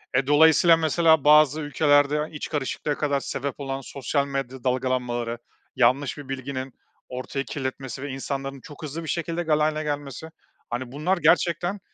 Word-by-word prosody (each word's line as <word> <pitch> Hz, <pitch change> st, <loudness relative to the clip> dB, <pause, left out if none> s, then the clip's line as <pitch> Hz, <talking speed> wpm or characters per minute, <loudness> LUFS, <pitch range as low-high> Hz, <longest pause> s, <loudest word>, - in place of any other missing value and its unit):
Eee, 130 Hz, +1 st, +2 dB
dolayısıyla, 160 Hz, +3 st, +6 dB
mesela, 160 Hz, -1 st, +3 dB
bazı 150 Hz, 0 st, +5 dB
ülkelerde 145 Hz, +1 st, +2 dB
iç 150 Hz, -, -5 dB
karışıklığa 145 Hz, 0 st, -2 dB
kadar 145 Hz, -2 st, 0 dB
sebep 140 Hz, 0 st, -4 dB
olan 135 Hz, -1 st, -4 dB
sosyal 140 Hz, +2 st, -2 dB
medya 135 Hz, -2 st, -4 dB
dalgalanmaları, 125 Hz, -2 st, -1 dB, 0.4 s
yanlış 130 Hz, +3 st, +2 dB
bir 145 Hz, -2 st, -10 dB
bilginin 130 Hz, -1 st, -5 dB, 0.4 s
ortayı 130 Hz, +2 st, -4 dB
kirletmesi 130 Hz, -1 st, -5 dB
ve 145 Hz, -, -5 dB
insanların 135 Hz, 0 st, -5 dB
çok 145 Hz, +5 st, -12 dB
hızlı 155 Hz, +3 st, -5 dB
bir -, -, -8 dB
şekilde 170 Hz, +2 st, -2 dB
galeyana 155 Hz, 0 st, +1 dB
gelmesi. 145 Hz, +1 st, -5 dB, 0.4 s
Hani, 120 Hz, +1 st, -4 dB
bunlar 155 Hz, +8 st, 0 dB
gerçekten 175 Hz, +2 st, +2 dB
140 Hz, 145 wpm, -25 LUFS, 130-155 Hz, 0.4 s, dolayısıyla